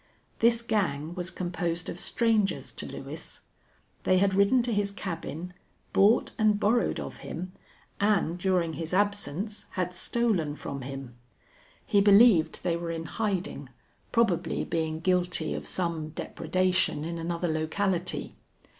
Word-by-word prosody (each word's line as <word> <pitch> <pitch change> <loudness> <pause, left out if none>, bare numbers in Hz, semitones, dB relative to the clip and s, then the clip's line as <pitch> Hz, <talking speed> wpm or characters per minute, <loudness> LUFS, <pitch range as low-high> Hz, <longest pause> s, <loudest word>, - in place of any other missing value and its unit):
This 235 0 +4
gang 170 -9 -1
was 180 0 -3
composed 175 -1 -3
of - - -4
strangers 225 -4 +1
to - - -5
Lewis. - - -8 0.6
They 185 - +3
had 195 +1 +3
ridden 200 +6 +4
to 240 -1 -1
his 205 -1 +1
cabin, 180 -3 -5 0.4
bought 210 +5 +4
and 215 -1 +4
borrowed 230 +3 +2
of - - -6
him, 180 +3 -6 0.5
and, 200 -4 +2
during 175 -3 +1
his 165 +3 -3
absence, 205 0 -1
had 180 -1 -1
stolen 185 -6 0
from 140 -2 -6
him. 135 -2 -7 0.7
He 200 - +4
believed 200 -4 +6
they 170 - +1
were 170 0 -4
in 165 -1 -3
hiding, 185 - -2 0.4
probably 230 -8 +1
being 160 -1 -2
guilty 180 -2 +1
of - - -5
some 165 -4 -2
depredation 180 0 0
in 170 0 -4
another 170 +1 -2
locality. 175 +3 -1
180 Hz, 135 wpm, -28 LUFS, 165-205 Hz, 0.7 s, believed